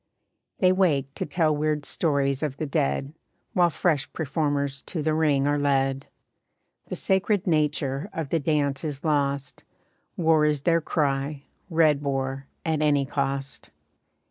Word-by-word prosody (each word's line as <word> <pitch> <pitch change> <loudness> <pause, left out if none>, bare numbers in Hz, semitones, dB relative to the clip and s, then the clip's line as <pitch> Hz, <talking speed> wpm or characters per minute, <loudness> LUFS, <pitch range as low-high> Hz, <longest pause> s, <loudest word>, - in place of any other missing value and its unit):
They 185 -1 +4
wake 150 -8 +1
to - - -4
tell 155 -3 +1
weird 150 -1 -1
stories 140 -4 0
of 145 -3 -2
the 155 - -2
dead, 135 - -1 0.4
While 175 -4 +4
fresh 160 -2 0
performers 145 -3 -1
to 160 -4 -3
the 155 0 +1
ring 150 -3 +2
are 145 0 +1
led. 135 -1 +1 0.8
The - - -4
sacred 190 +1 +1
nature 150 -1 0
of 160 -4 -4
the 165 - +1
dance 145 -2 0
is 145 -3 -4
lost, 140 -3 -1 0.5
War 160 -2 +4
is 150 -2 +1
their 165 +1 +2
cry, 140 -2 -1 0.3
red 155 -4 +3
war, 135 -1 -2 0.2
at 160 -2 0
any 145 -2 +3
cost. 135 -1 -3
145 Hz, 145 wpm, -25 LUFS, 140-160 Hz, 0.8 s, They